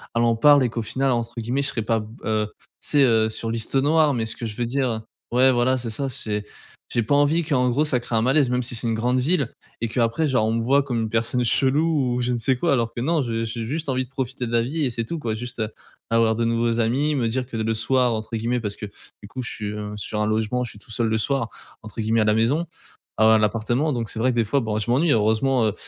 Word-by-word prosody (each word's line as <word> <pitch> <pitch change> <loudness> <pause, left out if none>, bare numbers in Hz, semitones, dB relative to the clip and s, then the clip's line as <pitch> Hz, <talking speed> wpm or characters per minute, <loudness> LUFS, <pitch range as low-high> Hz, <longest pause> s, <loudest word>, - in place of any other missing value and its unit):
en 115 -1 +2
parle 145 +2 +6
et 125 - +1
qu'au 115 0 -3
final, 135 +4 0
entre 120 -1 -1
guillemets, 125 +5 -1
je - - -1
serai 115 - -2
pas 115 +1 0
b 105 - -7 0.2
heu, 110 -1 0
tu - - -29 0.2
sais, 145 -2 +3
heu, 110 -4 +4
sur 115 +1 -4
«liste 115 +3 -2
noire,» 150 +2 +3
mais 115 -3 -1
ce 110 - -5
que 120 - -5
je 105 -2 -5
veux 120 - -1
dire, 130 +2 0
heu 110 -1 -2 0.3
ouais 130 +2 +5
voilà, 130 +1 +2
c'est 120 -2 -4
ça, 135 +5 -2
c'est 105 -4 -3 0.5
j'ai 120 - +2
pas 115 +6 +1
envie 145 +4 +3
qu'en 130 -5 +1
gros, 145 +6 +1
ça 130 -4 +1
crée 120 -1 -4
un 110 - +3
malaise. 130 +2 +3
Même 125 0 +1
si 120 0 -2
c'est 115 - -3
une 115 - +1
grande 120 +3 0
ville 140 -1 +1 0.3
et 115 - 0
qu'après 115 +6 0
genre 125 -6 +2
on 110 - +1
me 115 - 0
voit 140 +4 +3
comme 120 -4 -2
une 110 - -2
personne 115 +2 0
chelou 140 +1 +2
ou 125 - -1
je 125 0 0
ne 120 - 0
sais 130 +3 +2
quoi 170 - +1
alors 115 -2 0
que 120 - -4
non, 155 +2 +1
je 115 -1 -2
j'ai 115 0 -4
juste 150 +5 -3
envie 130 -1 0
de - - -24
profiter 130 -1 -3
de 115 - -5
la 115 0 +3
vie 145 +5 -1
et 125 - -1
c'est 115 0 -3
tout 170 - -4
quoi. 115 -7 -3
Juste, 120 +2 -6
heu, 110 -1 -1 0.4
avoir 115 -1 +3
de 115 - 0
nouveaux 115 0 +1
amis, 135 +7 +1
me 125 -4 0
dire 125 +2 -2
que 120 - -6
le 115 0 0
soir 125 +2 +1
entre 110 +1 -4
guillemets 120 +3 -1
parce 105 -3 -4
que 105 - -7 0.4
du - - -8
coup, 130 +5 -6
je 125 - -3
suis, 105 - -5
heu, 105 0 -5
sur 105 +1 -3
un 105 - +1
logement, 110 +3 0
je 120 - -4
suis 105 - -13
«tout 110 - -12
seul 115 +1 0
le 110 0 +1
soir» 125 0 0 0.3
entre 110 +1 -9
guillemets 110 +1 +2
à - - +2
la 105 0 +3
maison, 140 +10 +1 0.5
à 110 +1 +6
à - - +6
l'appartement 115 +7 0
donc 115 -3 -3
c'est 110 - -5
vrai 130 +3 +2
que 120 - -4
des 115 - +4
fois 125 +7 +1
bon 110 -2 -2
je 115 +3 -1
m'ennuie. 145 +5 +3
Heureusement, 110 +3 +2
heu, 105 - +1
120 Hz, 290 wpm, -23 LUFS, 110-130 Hz, 0.5 s, parle